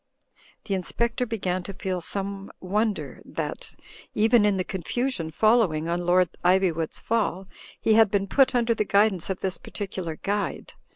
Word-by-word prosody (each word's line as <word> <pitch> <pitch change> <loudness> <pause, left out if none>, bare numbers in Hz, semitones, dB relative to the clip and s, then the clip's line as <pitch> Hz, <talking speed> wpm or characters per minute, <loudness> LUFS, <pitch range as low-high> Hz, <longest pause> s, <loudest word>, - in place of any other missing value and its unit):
The 200 - -2
Inspector 230 +6 -1
began 185 -5 -2
to 195 +2 -7
feel 185 -2 -3
some 195 +2 -4
wonder 210 +3 -2
that, - - -5 0.4
even 220 0 +4
in 205 -2 +2
the 185 - 0
confusion 190 0 -2
following 185 -4 +2
on 175 +1 -2
Lord 180 -1 +4
Ivywood*s 180 -3 +2
fall, 200 -4 -1 0.3
he 220 - +3
had 220 -1 +6
been 200 0 +1
put 260 +6 +3
under 235 -1 +3
the 215 - 0
guidance 200 -3 +2
of 190 - -3
this 190 -1 -1
particular 185 -5 -5
guide. 205 +5 -3
195 Hz, 155 wpm, -25 LUFS, 180-220 Hz, 0.4 s, had